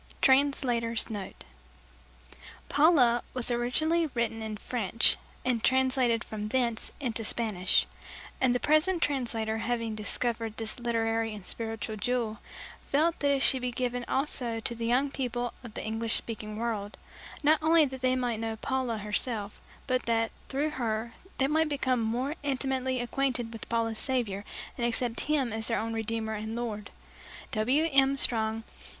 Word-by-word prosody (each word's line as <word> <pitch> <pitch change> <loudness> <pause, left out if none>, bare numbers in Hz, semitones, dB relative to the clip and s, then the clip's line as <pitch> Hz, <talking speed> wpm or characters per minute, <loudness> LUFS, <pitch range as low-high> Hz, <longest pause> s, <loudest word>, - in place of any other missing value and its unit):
Translator's 245 -5 +3
note: 200 -3 -6 1.3
"Paula" 280 -6 +5
was 250 -1 0
originally 310 +8 +2
written 225 -1 0
in 215 -1 -4
French 230 -1 +2 0.3
and 245 -3 +1
translated 260 -3 +3
from 210 -1 -5
thence 235 -1 0
into 235 -5 -2
Spanish; 210 -5 +2 0.6
and 255 -2 +4
the - - +2
present 315 +5 +3
translator 225 -5 -1
having 230 -1 -1
discovered 225 +1 -2
this 225 +2 -3
literary 225 -2 0
and 200 -3 -10
spiritual 225 -1 -3
jewel, 225 0 -1 0.5
felt 320 +4 +2
that 285 - +2
it 280 -1 +2
should 260 - +4
be 250 - 0
given 245 0 -2
also 255 -4 -1
to 225 - -3
the 230 0 -3
young 265 +4 +2
people 245 -3 -2
of 235 -3 -10
the - - -4
English 225 +1 -1
speaking 215 -2 -5
world, 220 -3 -3 0.5
not 305 +1 +5
only 320 0 +5
that 265 -2 -6
they 255 0 +3
might 245 -3 -1
know 225 0 -2
Paula 255 0 -1
herself, 210 0 -3 0.2
but 255 -2 -1
that, 225 -1 +1 0.2
through 290 +3 0
her, 230 -3 -2 0.2
they 265 - +3
might 310 +2 +2
become 260 -4 +1
more 245 +6 -1
intimately 265 -2 -1
acquainted 245 -1 -1
with 225 - -8
Paula's 225 -1 0
Saviour 225 -7 -1 0.3
and - - -1
accept 240 0 0
Him 270 -7 +1
as 220 0 -3
their 230 - +1
own 225 +1 -2
Redeemer 225 0 -2
and 220 +1 -4
Lord. 215 -4 -4 0.6
W. 255 +9 +2
M. 275 0 +4
STRONG. 225 -3 +4
235 Hz, 155 wpm, -29 LUFS, 225-260 Hz, 1.3 s, Paula